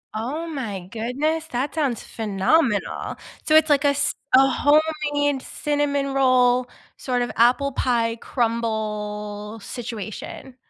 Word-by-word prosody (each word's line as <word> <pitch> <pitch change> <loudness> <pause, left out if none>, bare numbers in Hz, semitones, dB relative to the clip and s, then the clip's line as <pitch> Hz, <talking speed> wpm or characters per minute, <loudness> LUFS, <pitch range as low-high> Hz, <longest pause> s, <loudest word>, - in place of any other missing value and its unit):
Oh 285 +10 -3
my 210 - -5
goodness, 285 +8 -1
that 265 +3 -3
sounds 275 -8 0
phenomenal. 215 +3 0 0.3
So, 310 - +3
it's 315 0 +6
like 285 0 +4
a - - +6
s 280 0 0 0.2
a 270 +1 +7
homemade 290 -1 +2
cinnamon 285 -2 -1
roll, 255 -2 +3 0.3
sort 250 -2 -1
of 240 - -1
apple 255 +5 +3
pie 230 -3 +1
crumble 215 -3 -3
situation. 235 +2 -7
255 Hz, 120 wpm, -23 LUFS, 225-290 Hz, 0.3 s, a